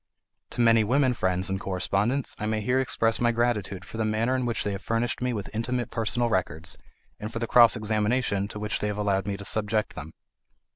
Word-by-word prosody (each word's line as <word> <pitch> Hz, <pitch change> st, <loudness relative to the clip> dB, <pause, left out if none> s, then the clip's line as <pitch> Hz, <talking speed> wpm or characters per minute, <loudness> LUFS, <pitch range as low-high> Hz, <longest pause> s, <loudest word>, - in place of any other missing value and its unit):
To -, -, -2 dB
many 115 Hz, -1 st, +5 dB
women 130 Hz, +3 st, +2 dB
friends 95 Hz, -4 st, 0 dB
and 95 Hz, 0 st, -1 dB
correspondents 100 Hz, +8 st, 0 dB
I 105 Hz, -, -2 dB
may 110 Hz, 0 st, -1 dB
here 125 Hz, +5 st, +1 dB
express 115 Hz, -3 st, +1 dB
my 120 Hz, 0 st, +3 dB
gratitude 105 Hz, -5 st, -1 dB
for 110 Hz, -, -9 dB
the 110 Hz, -, 0 dB
manner 110 Hz, +4 st, +1 dB
in 130 Hz, -1 st, -1 dB
which 115 Hz, -, -1 dB
they 105 Hz, -, -1 dB
have 100 Hz, 0 st, -5 dB
furnished 115 Hz, +2 st, -1 dB
me 125 Hz, 0 st, 0 dB
with 105 Hz, -3 st, -5 dB
intimate 120 Hz, +2 st, -2 dB
personal 115 Hz, +2 st, 0 dB
records, 85 Hz, -7 st, -1 dB, 0.4 s
and 105 Hz, +1 st, -5 dB
for 115 Hz, -, -5 dB
the 115 Hz, -, -1 dB
cross 120 Hz, 0 st, +6 dB
examination 105 Hz, -1 st, 0 dB
to 105 Hz, -, -8 dB
which 105 Hz, 0 st, -2 dB
they 105 Hz, -, -1 dB
have 105 Hz, 0 st, -3 dB
allowed 100 Hz, -2 st, 0 dB
me 100 Hz, -1 st, -2 dB
to 100 Hz, -, -9 dB
subject 105 Hz, 0 st, 0 dB
them. 80 Hz, +2 st, -8 dB
110 Hz, 220 wpm, -26 LUFS, 100-120 Hz, 0.4 s, cross